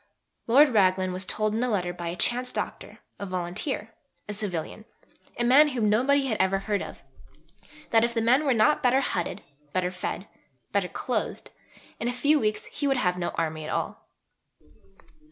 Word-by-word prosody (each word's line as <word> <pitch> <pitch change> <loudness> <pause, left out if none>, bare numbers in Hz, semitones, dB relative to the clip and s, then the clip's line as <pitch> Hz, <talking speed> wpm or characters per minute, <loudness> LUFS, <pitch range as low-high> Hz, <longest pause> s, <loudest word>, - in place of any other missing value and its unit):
Lord 280 +6 +6
Raglan 185 -4 +2
was 185 +1 -3
told 215 +2 -1
in 225 - 0
a 250 - +1
letter 180 -5 -1
by 175 -1 -6
a 170 - -3
chance 250 +6 +1
Doctor, - - -5 0.2
a 200 - -5
volunteer, 185 - -3 0.3
a 210 - -4
civilian, 200 0 -4 0.5
a 240 - 0
man 270 +5 +6
whom 235 -7 +1
nobody 270 +5 +3
had 225 -5 -1
ever 190 +1 +2
heard 200 +1 -1
of, - - -8 0.9
that 225 0 +5
if 235 - +1
the - - +2
men 245 +6 +3
were 275 -3 +3
not 300 +8 +3
better 260 0 +3
hutted, 180 -9 -2 0.3
better 180 -1 0
fed, 180 +1 -4 0.5
better 200 -2 +1
clothed, 250 - -3 0.5
in 235 - -2
a - - +1
few 290 +5 +3
weeks 215 -3 -1
he 290 - -3
would 270 -1 +2
have 180 -6 +1
no 175 - -1
army 155 -1 -2
at 155 - -6
all. - - -4
215 Hz, 180 wpm, -26 LUFS, 185-250 Hz, 0.9 s, Lord